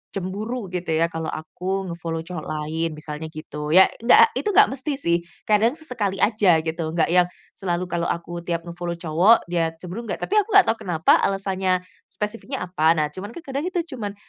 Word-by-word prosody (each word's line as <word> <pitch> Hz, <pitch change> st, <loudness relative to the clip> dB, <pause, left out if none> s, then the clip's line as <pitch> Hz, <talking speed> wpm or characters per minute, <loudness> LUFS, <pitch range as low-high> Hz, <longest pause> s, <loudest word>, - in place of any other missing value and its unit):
cemburu 200 Hz, +3 st, -4 dB
gitu 175 Hz, -3 st, -2 dB
ya, 165 Hz, +1 st, +1 dB
kalau 160 Hz, 0 st, -4 dB
aku 180 Hz, +4 st, -4 dB
nge-follow 165 Hz, -1 st, -4 dB
cowok 165 Hz, -2 st, -7 dB
lain 155 Hz, +1 st, -3 dB
misalnya 155 Hz, +1 st, -6 dB
gitu 155 Hz, 0 st, -4 dB
ya, 190 Hz, -, +10 dB, 0.2 s
enggak, 445 Hz, -, +6 dB
itu 440 Hz, -, -3 dB
enggak -, -, +6 dB
mesti 275 Hz, +2 st, -3 dB
sih, 170 Hz, -11 st, +1 dB, 0.3 s
kadang 220 Hz, +5 st, +3 dB
sesekali 210 Hz, -11 st, -2 dB
aja 205 Hz, -5 st, +4 dB
gitu, 160 Hz, 0 st, -3 dB
enggak 165 Hz, 0 st, +2 dB
yang 180 Hz, 0 st, +5 dB, 0.2 s
selalu 175 Hz, -1 st, -2 dB
kalau 170 Hz, -1 st, -2 dB
aku 170 Hz, 0 st, -4 dB
tiap 170 Hz, -1 st, -3 dB
nge-follow 170 Hz, 0 st, -5 dB
cowok 170 Hz, +7 st, +4 dB
dia 165 Hz, -2 st, 0 dB
cemburu 185 Hz, +7 st, -7 dB
enggak, -, -, -4 dB
tapi 425 Hz, +1 st, +3 dB
aku 405 Hz, 0 st, -1 dB
enggak 395 Hz, -, +8 dB
tahu 225 Hz, -, -4 dB
kenapa 160 Hz, -2 st, +4 dB
alasannya, 190 Hz, -2 st, 0 dB, 0.2 s
spesifiknya 230 Hz, +3 st, -5 dB
apa. 165 Hz, -2 st, +2 dB
Nah 150 Hz, -1 st, 0 dB
cuman 205 Hz, +7 st, -8 dB
kadang 280 Hz, +5 st, -3 dB
kita 355 Hz, -2 st, -1 dB
cuman, 205 Hz, -5 st, -5 dB
180 Hz, 185 wpm, -23 LUFS, 165-215 Hz, 0.3 s, ya